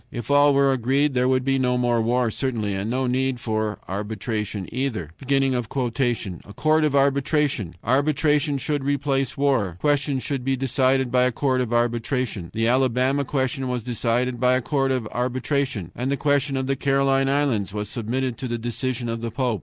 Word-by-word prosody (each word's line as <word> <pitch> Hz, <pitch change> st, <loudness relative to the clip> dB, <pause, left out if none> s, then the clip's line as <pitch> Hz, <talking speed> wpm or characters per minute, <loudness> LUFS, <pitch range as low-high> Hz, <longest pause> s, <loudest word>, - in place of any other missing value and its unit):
If 120 Hz, +2 st, -5 dB
all 145 Hz, 0 st, +5 dB
were 140 Hz, 0 st, +4 dB
agreed 135 Hz, +4 st, +1 dB
there 125 Hz, 0 st, +2 dB
would 130 Hz, -1 st, +1 dB
be 135 Hz, -1 st, +2 dB
no 125 Hz, -1 st, +1 dB
more 120 Hz, -2 st, +2 dB
war 120 Hz, +1 st, +1 dB
certainly, 110 Hz, -5 st, -2 dB
and 95 Hz, +3 st, -3 dB
no 130 Hz, +2 st, 0 dB
need 130 Hz, 0 st, 0 dB
for 110 Hz, -2 st, -2 dB
arbitration 105 Hz, 0 st, -4 dB
either. 115 Hz, -, -3 dB
"A 125 Hz, -6 st, -1 dB
court 155 Hz, +1 st, +2 dB
of 150 Hz, -2 st, +1 dB
arbitration! 140 Hz, -, +1 dB
Arbitration 145 Hz, +3 st, +2 dB
shall 145 Hz, +2 st, -1 dB
replace 135 Hz, -1 st, -1 dB
war. 130 Hz, -11 st, +1 dB
Questions 140 Hz, -1 st, 0 dB
shall 140 Hz, -2 st, -2 dB
be 135 Hz, +2 st, 0 dB
decided 130 Hz, 0 st, +1 dB
by 125 Hz, 0 st, +4 dB
a 125 Hz, -, +2 dB
court 130 Hz, +1 st, 0 dB
of 120 Hz, -2 st, -3 dB
arbitration. 120 Hz, -4 st, -1 dB
The 115 Hz, +1 st, 0 dB
Alabama 130 Hz, +2 st, +2 dB
question 135 Hz, -1 st, -1 dB
was 125 Hz, -2 st, -2 dB
decided 120 Hz, +1 st, -1 dB
by 125 Hz, +1 st, +3 dB
a 130 Hz, -, +1 dB
court 135 Hz, 0 st, 0 dB
of 125 Hz, -4 st, -1 dB
arbitration, 130 Hz, -, -2 dB
and 125 Hz, +2 st, -2 dB
the 140 Hz, -, 0 dB
question 145 Hz, -1 st, +1 dB
of 130 Hz, -, -1 dB
the 135 Hz, +1 st, 0 dB
Caroline 135 Hz, 0 st, +2 dB
Islands 135 Hz, -9 st, +1 dB
was 105 Hz, +1 st, -4 dB
submitted 120 Hz, +3 st, -3 dB
to 130 Hz, -, -3 dB
the 120 Hz, -1 st, -2 dB
decision 120 Hz, +1 st, -3 dB
of 115 Hz, 0 st, -3 dB
the 115 Hz, -, -3 dB
Pope. 120 Hz, -2 st, -1 dB
130 Hz, 180 wpm, -23 LUFS, 115-135 Hz, -, all